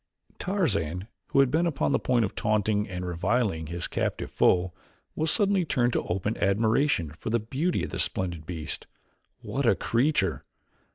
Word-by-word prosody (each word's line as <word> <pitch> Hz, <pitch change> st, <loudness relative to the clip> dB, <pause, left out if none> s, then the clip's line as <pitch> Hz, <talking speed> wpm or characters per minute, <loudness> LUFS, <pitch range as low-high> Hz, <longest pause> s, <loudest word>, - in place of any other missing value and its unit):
Tarzan 100 Hz, -, -1 dB, 0.2 s
who 135 Hz, -, +4 dB
had 135 Hz, -2 st, +2 dB
been 165 Hz, +4 st, +2 dB
upon 150 Hz, -4 st, 0 dB
the -, -, +2 dB
point 120 Hz, -3 st, +2 dB
of 95 Hz, -, -5 dB
taunting 105 Hz, -1 st, 0 dB
and 90 Hz, -1 st, -4 dB
reviling 90 Hz, -1 st, 0 dB
his 85 Hz, +2 st, -3 dB
captive -, -, -2 dB
foe 90 Hz, 0 st, +3 dB, 0.4 s
was 160 Hz, +1 st, +1 dB
suddenly 200 Hz, -3 st, +3 dB
turned 125 Hz, -6 st, +1 dB
to -, -, +1 dB
open 95 Hz, +5 st, -1 dB
admiration 105 Hz, -, +2 dB
for 80 Hz, -, -6 dB
the 115 Hz, -, +2 dB
beauty 135 Hz, +11 st, -1 dB
of -, -, -4 dB
the -, -, -4 dB
splendid 85 Hz, -4 st, -1 dB
beast. 80 Hz, -3 st, -5 dB, 0.6 s
What -, -, -1 dB
a -, -, +5 dB
creature! 115 Hz, -, +1 dB
105 Hz, 165 wpm, -27 LUFS, 90-135 Hz, 0.6 s, a